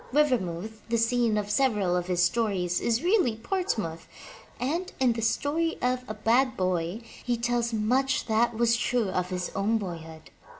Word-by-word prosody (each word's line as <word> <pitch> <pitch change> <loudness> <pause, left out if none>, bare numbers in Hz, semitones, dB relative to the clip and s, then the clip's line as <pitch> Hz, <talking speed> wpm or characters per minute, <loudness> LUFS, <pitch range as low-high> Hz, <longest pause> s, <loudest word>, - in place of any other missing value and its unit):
Rivermouth, 220 - 0
the 230 - +2
scene 230 -1 +2
of 205 0 -2
several 210 -7 +2
of 180 0 -1
his 180 -1 +2
stories, 180 -3 +1
is 235 +3 0
really 355 - +3
Portsmouth, 220 - -3 0.5
and 320 +9 -2
in 255 -3 +3
The 230 - -4
Story 295 +8 0
of 250 0 0
a 215 - -5
Bad 250 +4 +2
Boy, 185 +2 -1 0.2
he 245 -1 0
tells 240 0 0
much 255 +5 +1
that 225 0 +1
was 235 0 +3
true 240 -3 0
of 180 -1 -1
his 180 -1 -3
own 210 +3 +1
boyhood. 165 -5 -8
225 Hz, 165 wpm, -27 LUFS, 185-250 Hz, 0.5 s, really